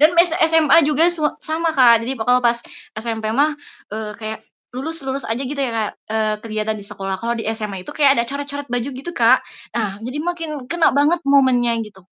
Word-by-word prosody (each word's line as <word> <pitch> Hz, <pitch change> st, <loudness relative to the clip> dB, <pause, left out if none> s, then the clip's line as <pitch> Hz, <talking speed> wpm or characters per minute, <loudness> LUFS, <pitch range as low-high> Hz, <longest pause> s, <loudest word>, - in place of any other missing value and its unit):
Dan 315 Hz, +3 st, +5 dB
mess 340 Hz, -1 st, +5 dB, 0.2 s
SMA 320 Hz, -1 st, +5 dB
juga 300 Hz, +2 st, +3 dB
s 345 Hz, -2 st, -3 dB, 0.2 s
sama 325 Hz, +1 st, -1 dB
Kak, 240 Hz, -5 st, +6 dB
jadi 260 Hz, +3 st, -3 dB
pokoknya 245 Hz, +2 st, +2 dB
pas 235 Hz, 0 st, +3 dB, 0.4 s
SMP 220 Hz, -1 st, -3 dB
mah, 295 Hz, +2 st, +3 dB, 0.4 s
eee, 215 Hz, 0 st, -4 dB
kayak 220 Hz, 0 st, -5 dB, 0.3 s
lulus 320 Hz, +5 st, -2 dB
lulus 270 Hz, +1 st, -2 dB
aja 225 Hz, -, -1 dB
gitu 280 Hz, +2 st, -5 dB
ya 265 Hz, -3 st, 0 dB
kayak, 220 Hz, -2 st, -1 dB, 0.2 s
eee, 215 Hz, -1 st, +1 dB
kelihatan 215 Hz, -1 st, -2 dB
di -, -, -10 dB
sekolah. 195 Hz, -1 st, -4 dB
Kalo 235 Hz, +1 st, -1 dB
di 225 Hz, -, -4 dB
SMA 210 Hz, -4 st, -5 dB
itu -, -, -8 dB
kayak 280 Hz, -2 st, +4 dB
ada 235 Hz, -, +2 dB
corat-coret 285 Hz, +1 st, -4 dB
baju 245 Hz, +1 st, 0 dB
gitu 275 Hz, +7 st, -6 dB
Kak, 240 Hz, +2 st, +5 dB, 0.4 s
nah 205 Hz, -4 st, -2 dB
jadi 255 Hz, +5 st, -5 dB
makin 325 Hz, -5 st, -4 dB
kena 345 Hz, -1 st, +3 dB
banget 305 Hz, +4 st, +3 dB
momennya, 260 Hz, -4 st, +4 dB
gitu. 200 Hz, -2 st, -15 dB
255 Hz, 205 wpm, -20 LUFS, 220-295 Hz, 0.4 s, Kak